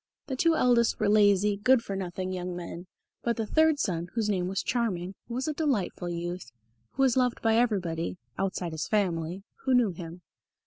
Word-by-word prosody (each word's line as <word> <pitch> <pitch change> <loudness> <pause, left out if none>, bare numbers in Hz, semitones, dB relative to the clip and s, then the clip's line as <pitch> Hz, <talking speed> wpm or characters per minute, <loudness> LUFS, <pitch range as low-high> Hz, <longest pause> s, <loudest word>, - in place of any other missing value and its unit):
The 270 - -3
two 330 +5 +3
eldest 240 -5 +3
were - - +2
lazy 205 -1 +4
good 250 +3 +4
for 200 - -4
nothing 185 0 -4
young 180 -1 -4
men, 175 0 -7 0.3
but 235 -1 -1
the 225 - -1
third 315 +5 +3
son, 175 -9 -1
whose 220 -3 0
name 185 -3 0
was 195 +1 -2
Charming, 195 -7 -1
was 250 +4 -3
a 310 - 0
delightful 235 - -1
youth, 175 -4 -4 0.4
who 270 - +1
was 260 -3 +4
loved 250 -2 +2
by 225 -1 +4
everybody 180 -8 0 0.2
(outside 185 -3 -2
his 160 0 -3
family) 180 -3 -1 0.2
who 260 -2 +4
knew 235 -5 +4
him. 170 0 -9
200 Hz, 185 wpm, -28 LUFS, 180-240 Hz, 0.4 s, lazy